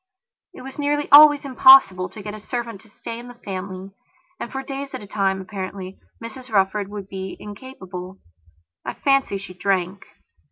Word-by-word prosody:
It - - -11
was 270 +2 -10
nearly 290 0 0
always 290 0 +8
impossible 255 -9 +6
to 210 - -11
get 210 0 -6
a 215 - -8
servant 230 -2 -5
to 220 - -21
stay 230 +2 -8
in 240 - -10
the 245 - -11
family 190 -3 -7 0.5
and, - - -6
for 270 0 -5
days 275 0 -6
at 255 - -7
a - - -9
time, 195 -2 -1
apparently, 190 -1 -7 0.2
Mrs 230 +3 -10
Rufford 200 -1 +1
would 205 -1 -8
be 190 -1 -7
incapable. 195 -5 -9 0.7
I - - -5
fancy 275 -7 +1
she 195 -1 -9
drank. 190 0 -2
210 Hz, 170 wpm, -22 LUFS, 190-260 Hz, 0.7 s, always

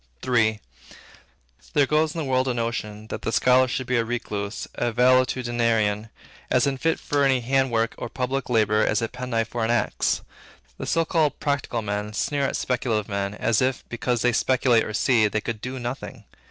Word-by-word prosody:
III. 110 -4 +2 1.1
There 145 - +4
goes 155 +3 +1
in - - -5
the 160 - -2
world 130 0 +1
a 125 - 0
notion, 110 -2 -3
that - - -5
the - - -2
scholar 125 +2 +4
should 130 +1 -3
be 125 0 0
a 115 - +2
recluse, 105 -3 -4
a 120 -1 -1
valetudinarian, 120 -3 +2 0.4
as - - +3
unfit 140 +4 0
for 145 -1 0
any 135 -2 +3
handiwork 120 -3 +1
or - - -5
public 130 +2 -3
labor, 110 -2 +3
as 110 +2 +1
a - - 0
penknife 120 -2 -3
for 120 -2 -2
an 110 - 0
axe. 120 0 +1 0.6
The - - -5
so 165 0 +2
called 155 -3 +1
'practical 140 -5 -1
men' 105 +1 -3
sneer 140 +5 0
at - - -3
speculative 115 -4 -1
men, 100 0 -2
as 110 +2 +1
if, 130 0 -1
because 120 0 -1
they 125 0 +3
speculate 125 -1 +3
or 110 - -5
see, 115 -2 +3
they 105 +1 -1
could 110 -1 -5
do 130 +1 -5
nothing. 120 +1 -6
120 Hz, 185 wpm, -24 LUFS, 110-130 Hz, 1.1 s, There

